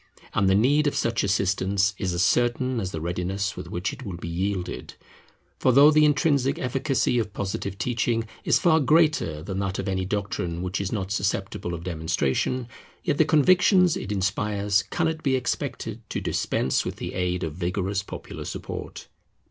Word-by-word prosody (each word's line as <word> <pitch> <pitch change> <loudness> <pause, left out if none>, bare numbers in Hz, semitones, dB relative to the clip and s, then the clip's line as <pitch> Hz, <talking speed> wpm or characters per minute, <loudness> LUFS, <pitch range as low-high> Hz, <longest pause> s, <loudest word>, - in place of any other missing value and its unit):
And 100 -1 +2
the 95 - +4
need 145 +8 +3
of 145 - 0
such 115 -1 0
assistance 95 0 +1
is 95 -3 -1
as 85 - +2
certain 120 +1 +1
as 95 -4 -2
the 80 - -5
readiness 90 +4 -2
with 90 -1 -7
which 90 +11 -2
it 135 -1 -9
will 95 -7 -6
be 85 - -7
yielded. 90 +2 -3 0.6
For 130 - +4
though 140 +4 +7
the 155 0 +5
intrinsic 145 -3 +2
efficacy 130 -1 0
of 105 -3 -3
Positive 95 0 -4
teaching 115 0 0 0.2
is - - +4
far 160 -4 +4
greater 155 - +2
than 95 +1 -4
that 95 -1 -2
of - - -3
any 95 -1 -1
doctrine 95 -4 -3
which 90 +2 -2
is 100 - -3
not 100 -3 -3
susceptible 100 -3 -2
of 85 - -8
demonstration, 80 - -1 0.4
yet - - 0
the 160 - +6
convictions 180 +3 +4
it 105 - -5
inspires 100 +1 +1
cannot 160 -1 -1
be 135 -3 +2
expected 125 -2 -3
to - - -2
dispense 65 - 0
with - - -4
the - - -6
aid 90 -1 -1
of 80 -2 -3
vigorous 95 +3 -1
popular 100 - -8
support. - - -6
100 Hz, 175 wpm, -25 LUFS, 95-130 Hz, 0.6 s, though